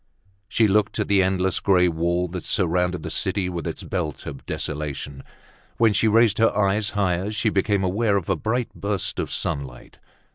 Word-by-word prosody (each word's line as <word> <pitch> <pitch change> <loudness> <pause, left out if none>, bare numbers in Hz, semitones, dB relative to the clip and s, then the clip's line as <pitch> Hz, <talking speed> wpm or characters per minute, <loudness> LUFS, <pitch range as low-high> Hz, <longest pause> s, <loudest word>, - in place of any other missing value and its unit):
She 110 +1 +3
looked 105 +1 +1
at - - -1
the 100 -1 +4
endless 95 -1 +1
gray 90 -2 +3
wall 85 +2 0
that 90 +1 -6
surrounded 90 -2 0
the - - -4
city 95 -2 0
with 85 -2 -4
its - - -5
belt 85 -6 -4
of 70 -2 -7
desolation. 75 -2 -4 0.6
When 115 -2 +4
she 100 +3 +2
raised 110 -1 +4
her 115 - +4
eyes 105 +1 +2
higher, 95 0 0
she 110 +1 0
became 100 0 +1
aware 100 +3 +1
of 90 - -4
a 95 - +1
bright 110 +8 -2
burst 100 -2 -2
of - - -3
sunlight. 65 -4 -4
95 Hz, 180 wpm, -23 LUFS, 85-105 Hz, 0.6 s, the